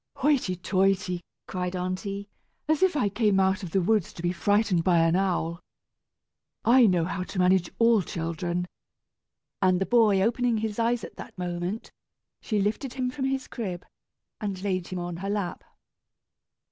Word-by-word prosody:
"Hoity 265 -10 +1
toity!" 185 -1 +1 0.3
cried 180 0 -3
aunty, 195 +2 -3 0.4
"as 310 -1 +2
if 375 -4 +3
I 250 - +2
came 205 -1 +2
out 190 0 +2
of 185 - -5
the 190 +2 +1
woods 210 -1 +1
to 170 - -9
be 175 - +1
frightened 205 -2 +2
by 180 -1 +3
an 165 +1 +4
owl. 175 -3 0 1.1
I 245 0 +7
know 175 -4 +2
how 180 - -3
to 185 - -6
manage 180 -1 +3
all 230 -2 +5
children!" 170 +1 -3 1.0
and 185 -1 +3
the 195 - +1
boy 220 -4 +4
opening 240 +1 +1
his 215 0 -3
eyes 235 +1 +1
at - - -9
that 225 - -10
moment, 180 +3 -4 0.5
she 215 -3 -1
lifted 220 +6 -1
him 255 -1 -1
from 265 0 -3
his 270 0 -1
crib, 185 -7 -5 0.5
and 200 -3 -4
laid 185 -3 -1
him 185 - -5
on 175 -1 -4
her 195 +3 -4
lap. 200 -4 -2
195 Hz, 165 wpm, -27 LUFS, 180-225 Hz, 1.1 s, I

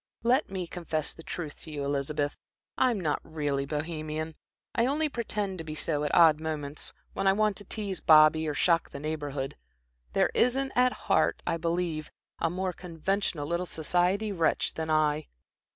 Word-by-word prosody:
Let 255 +5 +3
me 190 -2 -3
confess 165 -3 -2
the - - -12
truth 160 -2 -6
to 160 - -10
you, 145 -2 -3
Elizabeth. 145 +1 -1 0.4
I'm 250 -5 +2
not 155 -5 0
really 145 -3 -2
Bohemian 155 +1 -3 0.4
I 235 +1 +2
only 300 +3 +1
pretend 210 -7 -2
to - - -4
be 155 -1 -6
so 150 -1 0
at 150 - 0
odd 160 -3 +7
moments, 155 -2 -4 0.2
when 195 - 0
I 195 - +6
want 215 0 +2
to 205 - -8
tease 200 -3 -4
Bobby, 155 0 +6
or 150 - -1
shock 165 +1 +3
the - - -7
Neighborhood. 145 -3 -3 0.6
There - - +3
isn't 265 +2 +2
at 250 0 +5
heart, - - +1
I - - 0
believe, 165 -2 -1 0.3
a 165 - +1
more 185 +1 -2
conventional 175 -2 -2
little 170 +3 -1
society 180 +7 +1
wretch 165 -5 +1
than 160 0 -4
I. 155 -1 +2
160 Hz, 170 wpm, -29 LUFS, 155-195 Hz, 0.6 s, odd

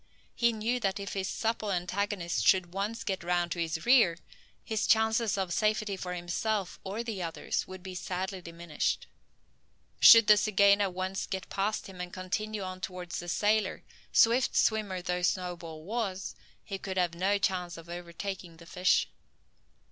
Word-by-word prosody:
He 235 0 +3
knew 230 +3 -1
that 195 -3 -1
if 200 - -5
his 190 -1 -2
supple 220 0 -1
antagonist 185 0 0
could 180 -2 +2
once 210 +4 -3
get 190 -4 -3
round 175 0 0
to 175 - -3
his 160 -1 -2
rear, 230 -10 +5 0.5
his 220 -1 -1
chances 220 -1 +3
of 185 -3 -1
safety 215 -1 +1
for 180 -1 -5
himself 190 +3 -2
or 205 +5 -4
the 220 -5 -4
others 165 -2 -3
would 185 -1 -9
be 190 -1 -7
sadly 185 +1 -4
diminished. 170 -2 -3 0.9
Should 230 -1 +10
the 210 0 +7
zygaena 200 -1 +4
once 185 +1 -3
get 190 -1 -5
past 205 +2 -1
him 185 -2 -8
and 180 0 -6
continue 205 +3 -3
on 185 0 -6
towards 180 -3 -5
the 175 - -6
sailor, 210 +1 +1 0.3
swift 235 +3 +4
swimmer 205 -5 +1
as 180 0 +1
Snowball 170 -3 -4
was, 195 -1 -3 0.3
he 195 -1 -6
could 190 -1 -5
have 175 -2 +1
no 190 +4 +1
chance 180 -3 -1
of 165 0 -11
overtaking 175 0 -6
a 170 - -13
fish. 180 +2 +2
190 Hz, 165 wpm, -30 LUFS, 180-210 Hz, 0.9 s, Should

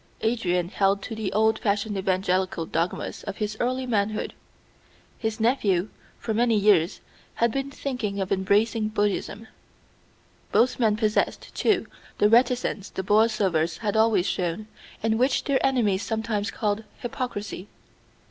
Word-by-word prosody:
Adrian 180 -7 0
held 195 0 +1
to 230 - -5
the 220 -3 -3
old 220 +1 +2
fashioned 205 -1 0
evangelical 185 -2 0
dogmas 165 +3 -2
of 200 -2 -5
his 210 0 -2
early 255 +1 0
manhood; 215 -3 -1 0.9
his 220 -1 -2
nephew 215 -5 +2 0.3
for 220 - -3
many 230 +1 +2
years 200 -4 +3 0.3
had 235 0 +2
been 275 +3 -2
thinking 250 -8 -3
of 190 -1 -3
embracing 210 +3 +2
Buddhism. 210 +1 -2 1.0
Both 250 +2 +3
men 215 -3 +3
possessed, 215 -1 0
too, 415 -4 +1 0.3
the 210 - +4
reticence 240 -3 +2
the 190 - -4
Borlsovers 200 -6 +2
had 210 -2 -2
always 220 -4 +3
shown, 180 +3 -2 0.4
and 220 0 +1
which 255 +1 +2
their 280 -2 +1
enemies 225 -8 +2
sometimes 220 -2 -2
called 210 -1 -1 0.2
hypocrisy. 225 -6 -4
215 Hz, 135 wpm, -25 LUFS, 195-230 Hz, 1.0 s, the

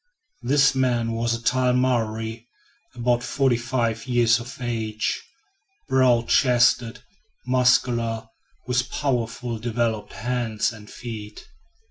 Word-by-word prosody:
This 135 +2 +3
man 120 -3 +1
was 115 0 0
a 115 - -8
tall 125 +1 +2
Maori, 115 -2 -1 0.5
about 120 0 +1
forty 130 +1 +1
five 120 -1 -2
years 120 -2 +3
of 120 +2 -9
age, 110 -3 -2 0.7
broad 125 -3 +3
chested, 125 -1 +3 0.4
muscular, 120 -3 +2 0.4
with 125 0 0
powerfully 120 -4 -2
developed 115 -2 -2
hands 120 -2 -1
and 105 -2 -13
feet. 110 -3 -8
120 Hz, 105 wpm, -24 LUFS, 115-125 Hz, 0.7 s, This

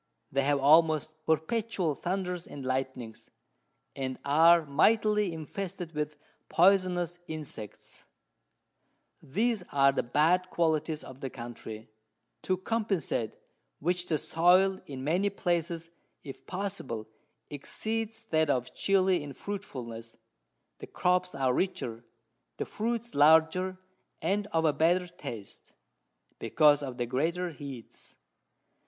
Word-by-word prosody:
They 135 - +2
have 140 +1 +2
almost 155 +2 +4
perpetual 180 +1 0
Thunders 180 +2 -3
and 140 -2 -8
Lightnings, 130 -3 -3 0.7
and 130 -1 -3
are 165 +3 +6
mightily 210 +6 +3
infested 175 +2 -5
with 150 0 -3 0.3
poisonous 180 -2 +3
Insects: 145 -10 -9 1.1
These 220 - 0
are 140 -1 +5
the 135 - 0
bad 165 +9 +2
Qualities 160 -2 0
of 130 0 -11
the 135 - -4
Country, 115 -3 -8 0.5
to 185 - 0
compensate 195 - -1 0.4
which, 175 +3 0
the 155 - +1
Soil, 185 +5 +3
in 130 -2 -6
many 180 +8 +2
places, 170 -3 -2 0.3
if 135 -3 -10
possible, 180 - -4 0.4
exceeds 220 +9 -4
that 160 -1 +3
of 125 -3 0
Chili 190 -3 +2
in 145 -1 -7
Fruitfulness; 120 - -7 0.6
the - - -8
Crops 180 0 +1
are 130 -2 +1
richer, 120 -10 -2 0.5
the - - -2
Fruits 235 +1 -3
larger, 160 +5 +4 0.4
and 205 +1 0
of 165 -3 0
a 155 - +4
better 175 +4 +3
Taste, 140 - -9 0.7
because 150 -2 +4
of 130 -3 -5
the 120 - -1
greater 165 +8 -1
Heats. 140 -6 -10
160 Hz, 115 wpm, -29 LUFS, 140-185 Hz, 1.1 s, are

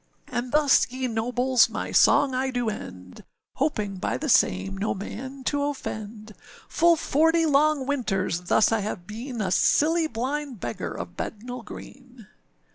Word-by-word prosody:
And 245 +1 -3
thus, 295 -2 +4
ye 255 +1 -3
nobles, 245 +2 +2
my - - -4
song 275 -2 +4
I 260 +1 0
do 245 -3 -1
end, 90 - -10 0.3
Hoping 210 -9 -1
by - - -2
the 305 - -4
same 195 -4 +2
no 200 +2 -2
man 260 +7 -7
to 285 +2 0
offend; 215 -6 -5 0.3
Full 340 0 +4
forty 325 +2 +2
long 300 -1 +3
winters 195 -11 -1
thus 215 - +3
I 225 - +2
have 195 -4 -5
been, 230 +4 -6
A 190 -3 -1
silly 320 - +3
blind 265 0 -4
beggar 115 - -4
of 85 0 -7
Bednall 245 +3 -6
Green. 250 +1 -12
245 Hz, 150 wpm, -25 LUFS, 210-280 Hz, 0.3 s, thus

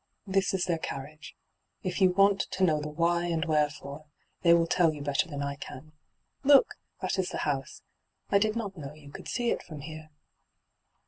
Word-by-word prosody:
This 195 -1 +1
is 185 - 0
their 170 -2 0
carrit^. 150 +1 -7 0.5
If 185 +1 -2
you 185 - +7
waot 195 +2 +4
to 190 - -1
know 155 -4 +3
the 150 - -4
why 170 +3 +1
and 165 -1 0
wherefore, 150 -1 -1 0.4
they 170 - +5
will 170 0 +5
tell 170 0 +3
yoa 150 -2 -5
better 145 +4 0
than 145 -2 -4
I 140 0 -2
can. 140 +2 -10 0.5
Look! 280 -1 +6 0.3
that 185 +1 0
is 185 - 0
the - - -4
house. 135 -3 -3 0.5
I 200 - +5
did 215 +1 +1
not 205 -4 -3
know 150 -3 -8
you 145 -2 -14
could - - -9
see 240 -2 0
it - - -1
from 155 -4 -9
here.' 155 +1 -9
165 Hz, 195 wpm, -29 LUFS, 150-185 Hz, 0.5 s, you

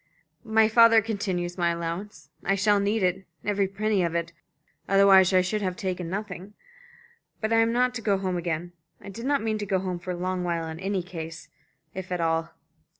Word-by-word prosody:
"My 220 -1 +4
father 230 0 +6
continues 190 -5 -3
my 170 -1 +2
allowance. 170 -2 -5
I 195 - +1
shall 205 +1 +3
need 205 +1 0
it, 185 +1 0 0.2
every 200 -1 +1
penny 205 0 0
of 170 -1 -1
it 170 0 -2 0.6
otherwise 195 -1 +6
I 185 -1 +5
should 210 +4 -2
have 185 -2 -2
taken 180 -3 -3
nothing. 195 0 -6 0.8
But 220 +1 -1
I - - +4
am 225 0 +3
not 250 +1 +2
to 240 - -5
go 200 -3 +1
home 190 -1 -2
again. 175 0 -3 0.3
I 200 - -10
did 230 +6 -6
not 285 -4 +1
mean 220 -1 -1
to 205 - -3
go 190 -1 +1
home 185 -1 -3
for 175 - -10
a 180 - -1
long 185 0 -2
while 170 -2 -1
in 160 0 -7
any 190 -1 -2
case, 165 -2 -8 0.4
if 185 -1 -7
at 180 - -1
all." 165 0 0
190 Hz, 205 wpm, -26 LUFS, 175-210 Hz, 0.8 s, father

